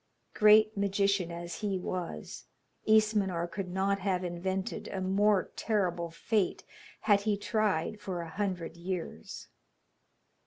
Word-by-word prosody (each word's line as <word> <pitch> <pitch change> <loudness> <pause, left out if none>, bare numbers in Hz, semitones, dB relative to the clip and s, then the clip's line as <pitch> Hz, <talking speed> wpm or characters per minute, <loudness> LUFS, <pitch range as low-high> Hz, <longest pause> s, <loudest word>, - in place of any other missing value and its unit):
Great 215 0 +6
magician 200 -2 +1
as 170 0 -6
he 205 -3 -1
was, 180 - -5 0.4
Ismenor 210 -5 +3
could 190 0 -4
not 195 +2 0
have 185 -2 0
invented 185 +2 -3
a 190 - -4
more 195 +1 +2
terrible 180 -6 0
fate 200 +3 -1 0.4
had 205 -2 +4
he 210 -1 0
tried 210 -2 0
for 185 -2 -4
a 165 - -7
hundred 180 -3 -3
years. 175 0 -5
190 Hz, 120 wpm, -30 LUFS, 175-205 Hz, 0.4 s, Great